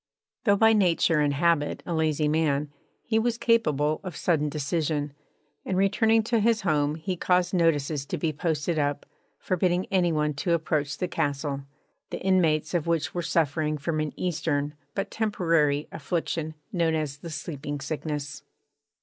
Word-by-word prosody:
Though 205 -3 +5
by 225 +2 +5
nature 175 -5 +3
and 145 -1 +2
habit 160 -1 +1
a 175 - -3
lazy 155 -2 +1
man, 150 -2 +1 0.3
he 220 -1 +1
was 230 0 0
capable 155 - +2
of 185 -5 -6
sudden 150 -3 +1
decision, 150 0 -1 0.5
and 185 - -2
returning 220 +3 +3
to 230 +1 +1
his 225 +1 +2
home 150 -5 +1
he 170 +4 -3
caused 180 +1 +1
notices 150 -5 +1
to - - -3
be 160 -2 -1
posted 160 +1 -1
up, 145 -1 -1 0.3
forbidding 180 0 0
any 180 -3 +3
one 150 -1 0
to 170 +5 -1
approach 155 -3 -1
the 180 - -1
castle, 140 -2 -2 0.4
the - - -5
inmates 175 -5 +2
of 170 -2 0
which 165 -2 0
were 175 - -1
suffering 155 -2 0
from 155 +2 -2
an 155 -1 -1
Eastern 150 -4 -1 0.2
but 195 - -2
temporary 165 -9 +1
affliction 160 0 -3 0.2
known 165 -3 +2
as 150 -3 -2
the 170 - -8
Sleeping 145 -2 -5
Sickness. 145 0 -4
160 Hz, 160 wpm, -26 LUFS, 150-180 Hz, 0.5 s, Though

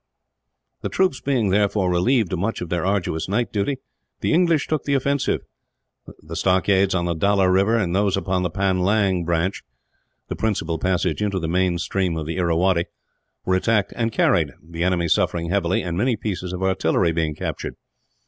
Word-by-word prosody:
The - - -3
troops 185 -8 +1
being, 125 -7 +1
therefore, 100 -2 +2
relieved 100 +3 +2
of 90 - -1
much 105 +5 -1
of 90 - -5
their 85 -1 -1
arduous 95 -4 -1
night 115 +4 -1
duty, 110 +7 0 0.4
the - - +1
English 165 -3 +3
took 155 -2 -1
the 140 - +1
offensive. 140 +1 0 0.8
The 80 +2 -8
stockades 95 +1 +2
on 85 -1 0
the 85 - 0
Dalla 100 +3 +2
river, 100 +5 +3
and 95 -5 0
those 100 -1 +2
upon 95 0 -1
the 90 - 0
Panlang 95 0 +1
branch 85 +3 -1 0.7
the - - -4
principal 85 -7 -1
passage 95 +2 0
into 100 -2 0
the 85 -3 -2
main 90 +1 +1
stream 90 -1 -1
of 80 - -4
the 85 +3 -4
Irrawaddy 85 0 +2 0.6
were 95 - +1
attacked 105 +2 +1
and 115 -1 -1
carried, - - +2
the 85 0 -4
enemy 90 -2 +1
suffering 85 +1 0
heavily, 95 -2 +1
and 85 -2 -3
many 125 +2 +2
pieces 95 -4 -4
of 90 +1 -4
artillery 95 -2 +1
being 80 -2 -1
captured. - - -5
95 Hz, 175 wpm, -22 LUFS, 85-105 Hz, 0.8 s, English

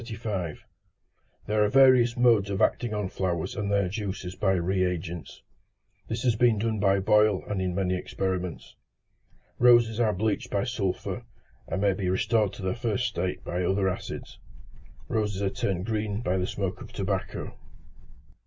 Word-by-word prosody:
There 105 0 +2
are 105 - +2
various 130 -3 +5
modes 115 -5 +4
of 100 -1 -2
acting 120 -2 +1
on 105 -2 -1
flowers 95 +5 -2
and 105 -3 -2
their 100 -2 +2
juices 95 -2 -4
by 95 0 +1
re 95 +1 +1
agents. 85 -2 -4 0.6
This 115 +1 -3
has 120 -3 +3
been 115 -1 +3
done 110 0 -1
by 100 0 +3
Boyle 105 0 +3
in 95 -3 -2
many 95 -1 0
experiments. 90 -1 -4 0.8
Roses 120 -2 +5
are 110 -3 +3
bleached 105 +1 -1
by 100 - 0
sulphur, 110 -7 -2 0.4
and 95 - -2
may 100 -1 +3
be 95 -1 -2
restored 105 +2 +2
to - - -9
their 95 - 0
first 120 0 -1
state 90 -3 -3
by 90 +1 -2
other 95 +2 +1
acids; 90 - -6 0.7
roses 105 -3 -1
are 95 - +1
turned 95 -2 -2
green 105 -1 -2
by 95 -5 0
the 90 - -1
smoke 95 -2 -3
of - - -10
tobacco. 95 -1 -3
100 Hz, 155 wpm, -27 LUFS, 95-110 Hz, 0.8 s, various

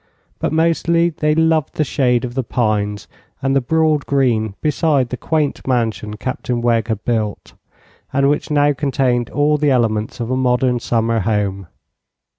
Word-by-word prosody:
But - - -1
mostly 165 +1 +2
they 150 -1 0
loved 160 -2 +1
the 155 - +1
shade 125 -4 +1
of 120 - -6
the 130 0 -1
pines 105 -4 -1 0.3
and 135 0 0
the 135 - +3
broad 155 +2 +1
green 115 -7 +1
beside 150 -4 +1
the 125 - -3
quaint 150 +1 -2
mansion 110 -4 -1
Captain 125 0 -3
Wegg 115 -2 +1
had 110 -2 -3
built, 110 -4 -2 0.6
and 140 0 +2
which 145 +1 0
now 145 -1 +3
contained 130 -4 0
all 150 +1 +2
the 150 0 +2
elements 110 -4 0
of 120 +1 -3
a - - +1
modern 125 -1 +1
summer 115 -1 0
home. 100 -3 -1
125 Hz, 160 wpm, -18 LUFS, 115-145 Hz, 0.6 s, the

